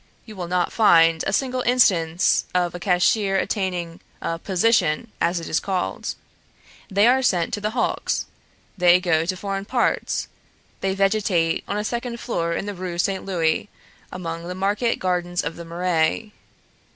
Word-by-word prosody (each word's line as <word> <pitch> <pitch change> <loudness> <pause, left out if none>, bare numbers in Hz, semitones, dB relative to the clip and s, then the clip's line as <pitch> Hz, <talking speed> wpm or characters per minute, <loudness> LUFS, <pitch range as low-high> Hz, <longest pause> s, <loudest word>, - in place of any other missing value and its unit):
You 215 - -11
will 180 -3 -5
not 180 0 0
find 165 -7 +5
a - - +1
single 255 +3 0
instance 180 -10 +3
of 175 -1 +1
a 175 - -6
cashier 195 +2 +2
attaining 180 -5 -2 0.2
a 165 0 -3
position, 190 0 +1
as 170 +1 +1
it 165 - -7
is 160 - +1
called. 190 -2 -3 0.7
They 200 +1 +3
are 255 +2 +4
sent 180 -9 +1
to 205 - -2
the 210 - 0
hulks; - - 0 0.5
they 180 -1 +5
go 170 -3 +1
to 185 0 -1
foreign 195 +1 -4
parts; 245 +2 0 0.5
they 190 0 -1
vegetate 195 -4 +1
on 205 - -2
a 210 - -1
second 235 +1 -4
floor 170 -9 -2
in - - -3
the 205 - -4
Rue 180 -2 -5
Saint 190 +1 -1
Louis 175 0 0 0.4
among 170 -2 -5
the 180 - -5
market 205 +5 0
gardens 175 -1 -1
of 150 +2 -4
the 170 - -9
Marais. 175 +4 0
185 Hz, 165 wpm, -23 LUFS, 170-205 Hz, 0.7 s, find